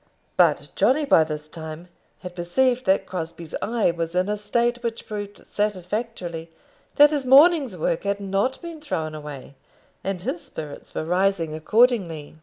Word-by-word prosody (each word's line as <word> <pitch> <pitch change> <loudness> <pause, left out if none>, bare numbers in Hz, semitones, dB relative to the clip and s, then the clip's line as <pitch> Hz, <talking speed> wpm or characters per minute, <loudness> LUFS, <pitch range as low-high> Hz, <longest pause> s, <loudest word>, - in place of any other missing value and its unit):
But - - +3
Johnny 295 +3 +3
by 165 - +6
this 155 -1 -5
time 160 +1 -8 0.3
had 180 -1 -8
perceived 245 +9 +1
that 190 +1 +3
Crosbie's 170 -2 -6
eye 225 -4 +1
was 170 0 -4
in 185 +2 +1
a 210 - +1
state 235 +4 0
which 230 -1 -4
proved 205 -1 -7
satisfactorily 190 -4 -3 0.5
that 295 +1 +7
his 290 -3 0
morning's 275 - +6
work 165 0 0
had 200 0 -1
not 200 +6 -1
been 335 -2 -7
thrown 160 - -3
away, 150 -3 -8 0.5
and 195 -1 -2
his 265 - -4
spirits 150 -2 -8
were - - -2
rising 180 -2 +1
accordingly. 170 - +1
195 Hz, 155 wpm, -24 LUFS, 165-240 Hz, 0.5 s, that